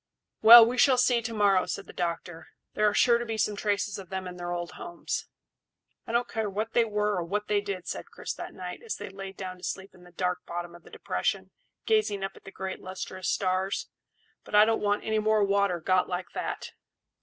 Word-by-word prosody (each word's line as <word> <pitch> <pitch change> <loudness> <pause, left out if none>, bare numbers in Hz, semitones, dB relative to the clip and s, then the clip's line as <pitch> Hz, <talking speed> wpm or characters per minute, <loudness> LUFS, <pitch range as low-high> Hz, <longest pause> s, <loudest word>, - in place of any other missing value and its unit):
"Well, 230 +1 +11
we 245 +2 -2
shall 260 -1 +6
see 245 -1 +3
to 230 0 -4
morrow," 200 -3 +3
said 200 - -4
the - - -12
doctor; 170 -1 -4 0.3
"there 210 0 +3
are - - -4
sure 235 -1 +5
to 240 - -3
be 225 -1 -3
some 210 -1 +1
traces 205 0 -1
of 190 -3 -10
them 190 -1 -4
in 180 0 -8
their 175 0 -4
old 175 0 -3
homes." 175 - -5 0.8
"I - - -4
don't 235 +1 +1
care 220 -2 -2
what 215 +3 -3
they 235 - +4
were 210 -2 0
or 175 - -1
what 205 +5 -3
they 205 -1 +2
did," 195 -3 -5
said - - -5
Chris - - -6
that - - -8
night, - - -7
as 460 -2 -4
they - - -7
laid 195 0 -8
down 185 -1 -6
to - - -20
sleep 190 0 -5
in 180 - -18
the 175 - -16
dark 180 +1 -1
bottom 175 0 -5
of 175 - -13
the - - -16
depression, - - -2 0.3
gazing 425 - +1
up 195 - -2
at - - -17
the 195 - -9
great 190 0 -5
lustrous 185 0 -5
stars; 190 0 -1 0.5
"but - - -5
I 210 +1 +8
don't 225 0 +1
want 205 0 +1
any 220 0 0
more 215 0 +3
water 200 -3 +2
got 185 +3 +1
like 180 0 -4
that. - - -4
200 Hz, 230 wpm, -28 LUFS, 185-215 Hz, 0.8 s, Well